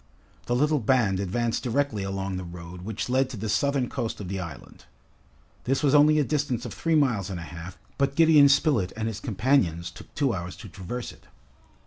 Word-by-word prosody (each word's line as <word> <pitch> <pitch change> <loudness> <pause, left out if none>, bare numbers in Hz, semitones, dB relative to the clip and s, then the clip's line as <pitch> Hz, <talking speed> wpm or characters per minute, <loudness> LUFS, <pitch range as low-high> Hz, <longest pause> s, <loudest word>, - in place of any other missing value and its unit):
The 120 - +1
little 150 +3 +2
band 110 -5 +2
advanced 115 +5 -1
directly 125 -3 0
along 95 0 -3
the 90 - -5
road 85 0 -9
which 105 +3 -4
led 130 +1 +2
to 130 - -7
the 110 +2 -4
southern 125 +5 +1
coast 115 - -4
of 95 -4 -6
the 95 0 -3
island. 85 -7 -9 0.8
This 135 +4 0
was 140 -1 +3
only 150 +1 +6
a 150 - +4
distance 135 -4 -1
of - - -6
three 165 -1 0
miles 120 - +2
and 95 -3 -4
a - - -6
half, 85 +2 -9 0.2
but 140 0 +1
Gideon 155 -3 +7
Spilett 140 - +2
and 110 0 -2
his 110 -2 -4
companions 95 - +1
took - - -13
two 140 -5 +1
hours 90 -2 -5
to 105 - -11
traverse 95 +7 -6
it. - - -19
115 Hz, 200 wpm, -26 LUFS, 95-140 Hz, 0.8 s, Gideon